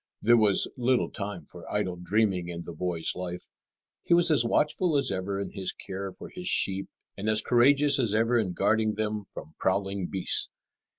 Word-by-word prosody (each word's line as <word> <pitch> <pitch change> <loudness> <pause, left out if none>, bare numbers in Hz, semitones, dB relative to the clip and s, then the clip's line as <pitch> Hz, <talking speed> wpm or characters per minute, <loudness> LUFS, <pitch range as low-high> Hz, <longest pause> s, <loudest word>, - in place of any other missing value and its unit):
There 120 +2 +4
was 105 -4 +3
little 125 0 +1
time 100 -6 -6
for - - -12
idle 90 -1 -1
dreaming 95 0 0
in 85 -1 -6
the 85 - -8
boy's 85 0 -2
life. 90 -1 -6 0.6
He 170 - +3
was 170 -1 +5
as 145 -6 +7
watchful 150 +6 +1
as 140 - +1
ever 95 +1 -3
in 100 - -5
his 95 -2 -3
care 95 0 -6
for - - -11
his 180 0 -7
sheep 95 - +1 0.3
and 105 +2 -3
as 110 0 +2
courageous 140 +3 +4
as 110 -5 0
ever 115 +2 +2
in 95 -5 -2
guarding 110 +3 +1
them 105 -1 -3
from 80 -4 -11
prowling 95 -1 -1
beasts. 95 -2 +2
100 Hz, 185 wpm, -27 LUFS, 95-120 Hz, 0.6 s, as